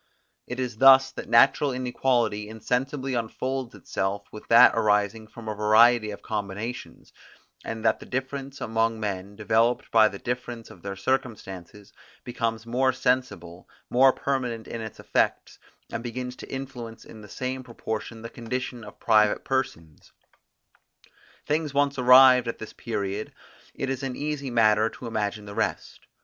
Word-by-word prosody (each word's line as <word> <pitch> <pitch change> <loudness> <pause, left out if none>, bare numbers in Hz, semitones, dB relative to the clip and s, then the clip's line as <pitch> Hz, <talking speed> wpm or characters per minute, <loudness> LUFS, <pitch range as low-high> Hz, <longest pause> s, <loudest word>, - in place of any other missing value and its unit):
It 125 - -5
is 125 -4 -3
thus 135 +1 +7
that - - -8
natural 135 +4 +5
inequality 120 -4 0
insensibly 130 +5 -2
unfolds 125 +1 -3
itself 100 +1 -3
with 105 - -11
that 115 - +8
arising 105 0 +1
from 110 +1 -12
a 110 - -2
variety 110 +2 +4
of 100 - -8
combinations, 105 +3 -6 0.5
and 115 0 -6
that - - +3
the - - -12
difference 135 +1 -4
among 115 0 0
men, 100 -1 -4
developed 115 +3 +1
by 110 -1 +6
the 100 - -6
difference 120 0 -5
of 90 - -15
their 100 +1 -5
circumstances, 105 -4 -4 0.3
becomes 115 -2 -3
more 130 +3 +2
sensible, 125 -10 -2 0.2
more 130 +2 +6
permanent 125 -5 -3
in 115 - -6
its 110 -1 -8
effects, - - -1 0.3
and - - -4
begins 125 +1 -5
to - - -10
influence 125 -4 -7
in 110 - -12
the 105 - -13
same 130 +3 -4
proportion 115 -2 -6
the 115 - -6
condition 125 0 -5
of 105 - -12
private 105 -2 +3
persons. 85 - -3 1.3
Things 150 -1 -1
once 140 -1 +1
arrived 125 0 +7
at 115 - -3
this 110 - -9
period, 105 -2 -4 0.4
it 135 - -3
is 135 0 -3
an 135 -2 -4
easy 145 -2 -3
matter 110 -2 +3
to 125 - -11
imagine 105 -2 -3
the 100 - -8
rest. - - -3
115 Hz, 150 wpm, -26 LUFS, 105-130 Hz, 1.3 s, that